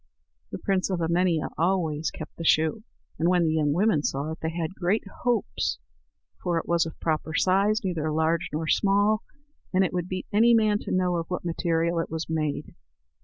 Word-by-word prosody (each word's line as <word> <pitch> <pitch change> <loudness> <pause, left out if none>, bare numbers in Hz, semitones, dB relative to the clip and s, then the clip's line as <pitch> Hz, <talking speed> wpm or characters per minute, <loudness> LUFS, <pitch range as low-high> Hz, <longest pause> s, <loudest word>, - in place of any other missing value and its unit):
The - - -4
prince 195 -2 0
of 185 -2 -1
Emania 170 -1 +1
always 165 -3 +1
kept 155 - -9
the 165 - -5
shoe; 160 +6 +2 0.4
and 165 +2 +3
when 180 -2 +3
the 155 - +1
young 150 -2 +2
women 180 0 +2
saw 145 +2 -2
it, 160 - -7
they 160 - -1
had 165 +1 -3
great 190 +4 0 0.2
hopes, 245 -2 0 0.6
for 175 -2 0
it 165 - -3
was 170 -1 +2
of 160 - -10
proper 155 -1 -1
size, 200 +5 +3
neither 160 -5 -1
large 160 +2 +1
nor 155 +1 -3
small, 205 +4 +3 0.5
and 190 0 +3
it - - -3
would 180 0 -2
beat 185 0 -4
any 230 +3 +5
man 215 -2 +3
to - - -6
know 180 -1 +1
of 165 -1 -3
what 180 -1 -4
material 170 0 0
it 165 - -2
was 160 0 -4
made. 155 -2 -2
170 Hz, 195 wpm, -26 LUFS, 160-190 Hz, 0.6 s, any